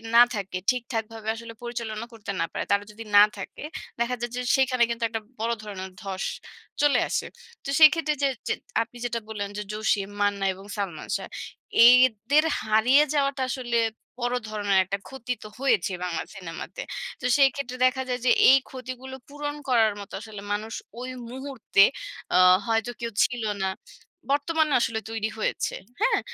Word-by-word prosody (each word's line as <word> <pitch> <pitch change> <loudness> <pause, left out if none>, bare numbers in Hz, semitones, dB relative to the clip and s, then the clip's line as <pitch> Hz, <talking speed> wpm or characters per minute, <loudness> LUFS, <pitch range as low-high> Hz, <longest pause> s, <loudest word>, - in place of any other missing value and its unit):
না 235 - +10
থাকে, 195 -3 -3
ঠিকঠাক 240 -2 -1
ভাবে 220 -1 -9
আসলে 230 0 -9
পরিচালনা 230 -2 -4
করতে 215 -3 -6
না - - +2
পারে। - - -3
তারা 200 0 +3
যদি 220 +2 -9
না 205 - +10
থাকে, 195 - -8 0.4
দেখা 235 +1 0
যায় 240 0 -3
যে 250 - -2
সেখানে 260 -2 +3
কিন্তু 235 0 -3
একটা 225 0 -3 0.2
বড় 230 +1 0
ধরনের 190 -3 -7
ধস 195 -2 -4 0.6
চলে 290 -4 +4
আসে। - - -1 0.4
তো - - -6
সেই 310 -1 +11
ক্ষেত্রে 315 -2 0
যে, - - +5 0.2
যে - - +2 0.3
আপনি 235 +1 -6
যেটা 235 -1 -1
বললেন 205 -2 -4
যে 210 - -3
জসিম, 210 -2 0
মান্না 205 -1 +1
এবং 190 +1 -13
সালমান 185 -7 -4
শাহ, - - -8 0.6
এদের 250 +3 +5 0.2
হারিয়ে 220 +7 +5
যাওয়াটা 275 -2 +1
আসলে 245 -2 -1 0.4
বড় 245 0 0
ধরনের 205 -2 +1
একটা 195 +2 -2
ক্ষতি 250 -2 -4
তো - - -8
হয়েছে 235 -9 +2
বাংলা 175 -2 -2
সিনেমাতে। 185 - -7 0.4
তো - - -6
সেই 275 -1 +6
ক্ষেত্রে 255 -2 -5
দেখা 260 +1 +2
যায় 250 0 -1
যে - - +5 0.2
এই 265 - +8
ক্ষতিগুলো 255 0 -7
পূরণ 290 0 -4
করার 225 -4 +4
মতো 200 - -10
আসলে 215 -2 -9
মানুষ 215 +2 -4 0.3
ওই 255 - -5 0.2
মুহূর্তে 260 -6 +2 0.5
অ - - +7 0.3
হয়তো 225 +1 +1
কেউ 235 -1 -3
ছিল 245 -2 -1 0.2
না। 190 - +1 0.6
বর্তমানে 310 +1 +1
আসলে 220 -2 0
তৈরি 220 -1 -2
হয়েছে। - - -1 0.3
হ্যাঁ? - - +3
235 Hz, 170 wpm, -26 LUFS, 210-255 Hz, 0.6 s, সেই